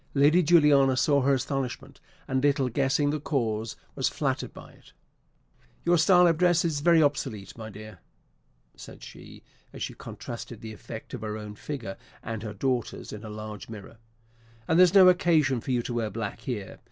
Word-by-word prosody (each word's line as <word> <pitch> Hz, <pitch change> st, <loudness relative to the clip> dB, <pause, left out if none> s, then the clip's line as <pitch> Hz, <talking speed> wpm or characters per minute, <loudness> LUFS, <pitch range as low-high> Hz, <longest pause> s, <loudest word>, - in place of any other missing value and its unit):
Lady 150 Hz, +6 st, +5 dB
Juliana 145 Hz, -5 st, +5 dB
saw 140 Hz, +1 st, +3 dB
her 135 Hz, +1 st, +3 dB
astonishment, 130 Hz, 0 st, -4 dB, 0.3 s
and, 130 Hz, 0 st, 0 dB
little 140 Hz, -2 st, +2 dB
guessing 140 Hz, +3 st, +1 dB
the 150 Hz, -, -2 dB
cause, 115 Hz, -7 st, -2 dB, 0.2 s
was -, -, 0 dB
flattered -, -, -2 dB
by -, -, -13 dB
it. -, -, -21 dB, 0.9 s
"Your 175 Hz, 0 st, +4 dB
style 180 Hz, +2 st, +6 dB
of 165 Hz, -2 st, +2 dB
dress 175 Hz, -2 st, +3 dB
is 155 Hz, -3 st, 0 dB
very 165 Hz, +1 st, +5 dB
obsolete, 130 Hz, -9 st, -2 dB
my 110 Hz, -1 st, -8 dB
dear," 105 Hz, -2 st, -11 dB, 0.8 s
said -, -, -12 dB
she, -, -, -12 dB, 0.3 s
as -, -, -6 dB
she -, -, -4 dB
contrasted 115 Hz, -1 st, -8 dB
the 110 Hz, -2 st, -7 dB
effect 110 Hz, +1 st, -10 dB
of 125 Hz, -, -5 dB
her 110 Hz, -1 st, -4 dB
own 105 Hz, -1 st, -8 dB
figure 115 Hz, -4 st, -6 dB, 0.3 s
and 110 Hz, -1 st, -5 dB
her 105 Hz, -2 st, -6 dB
daughter's 125 Hz, +1 st, -2 dB
in 105 Hz, +1 st, -8 dB
a 110 Hz, -, -7 dB
large 105 Hz, 0 st, -8 dB
mirror; 110 Hz, 0 st, -10 dB, 0.7 s
"and 160 Hz, -, +3 dB
there's 180 Hz, +1 st, +6 dB
no 190 Hz, -2 st, +9 dB
occasion 160 Hz, -, +3 dB
for -, -, -9 dB
you 125 Hz, -2 st, +1 dB
to 120 Hz, -, -4 dB
wear 115 Hz, -2 st, -1 dB
black 110 Hz, -2 st, -5 dB
here. 105 Hz, -7 st, -6 dB
130 Hz, 180 wpm, -27 LUFS, 110-150 Hz, 0.9 s, no